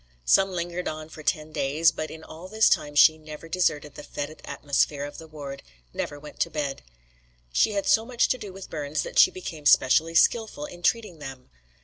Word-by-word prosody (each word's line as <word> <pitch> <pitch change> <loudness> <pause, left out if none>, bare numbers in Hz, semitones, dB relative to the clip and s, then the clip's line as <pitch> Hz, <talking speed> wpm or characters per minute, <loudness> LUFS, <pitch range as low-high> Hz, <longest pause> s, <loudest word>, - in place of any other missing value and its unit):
Some 195 - +4
lingered 175 0 -4
on 155 0 -5
for 155 - -11
ten 155 0 -1
days, 155 +3 +2
but 155 0 -5
in 160 0 -10
all 165 +4 -10
this 220 +2 +3
time 145 0 0
she 155 +2 +6
never 155 +1 -10
deserted 150 -4 0
the - - -9
fetid 145 +1 -6
atmosphere 140 0 0
of 145 +2 -9
the 160 - -11
ward, 145 -3 -8 0.3
never 145 - -4
went 150 +1 -12
to - - +1
bed. 145 -3 -3 0.7
She 210 - +3
had 200 -1 -1
so 220 - +4
much 240 0 +1
to 255 - 0
do 205 -3 -7
with 195 0 -11
burns 145 -1 -2
that - - -1
she - - +8
became 160 -5 -5
specially 160 +6 +4
skilful 220 -5 +2
in 175 +2 -11
treating 210 -4 0
them. 135 - -9
155 Hz, 205 wpm, -26 LUFS, 145-180 Hz, 0.7 s, she